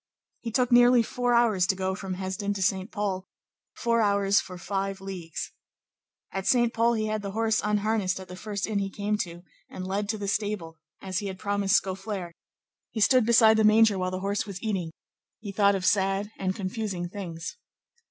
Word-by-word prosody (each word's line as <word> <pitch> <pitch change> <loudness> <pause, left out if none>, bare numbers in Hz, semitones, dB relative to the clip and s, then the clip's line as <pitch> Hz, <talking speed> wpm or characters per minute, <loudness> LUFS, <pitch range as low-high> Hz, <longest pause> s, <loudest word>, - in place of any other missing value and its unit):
He 235 - -5
took 250 +1 +1
nearly 245 0 +6
four 245 +1 0
hours 215 -6 +3
to 190 - +2
go 190 0 -1
from 190 -1 -5
Hesdin 190 +2 -3
to 195 - -1
Saint 190 +1 0
Pol; 200 -3 -2 0.5
four 230 -1 +1
hours 200 -1 +3
for 180 - -9
five 195 +1 -3
leagues. 185 -4 -6 0.8
At 195 0 -4
Saint 240 -2 +3
Pol 230 +1 +3
he 220 -1 0
had 215 0 -2
the 200 -1 -5
horse 225 0 +1
unharnessed 210 -2 0
at 190 - -9
the 180 - -9
first 205 +1 -4
inn 215 -2 -1
he 195 0 -2
came 205 +1 -1
to 175 -2 -5 0.3
and 185 - -6
led 200 +2 -2
to 215 - 0
the 205 -1 -4
stable; 200 -6 -2 0.2
as 190 -2 -2
he 205 - -4
had 190 -1 -5
promised 200 0 +1
Scaufflaire, 190 -1 -5 0.6
he 225 - -5
stood 245 +2 +4
beside 225 -2 +6
the 220 - +4
manger 215 -2 +5
while 185 0 0
the 185 0 -4
horse 200 +1 -1
was 195 -2 -6
eating; 195 -7 -1 0.5
he 210 -2 -6
thought 200 0 +3
of 185 -1 -2
sad 195 +1 +1
and 190 -1 -2
confusing 190 -2 -3
things. 175 - -7
200 Hz, 195 wpm, -27 LUFS, 190-215 Hz, 0.8 s, nearly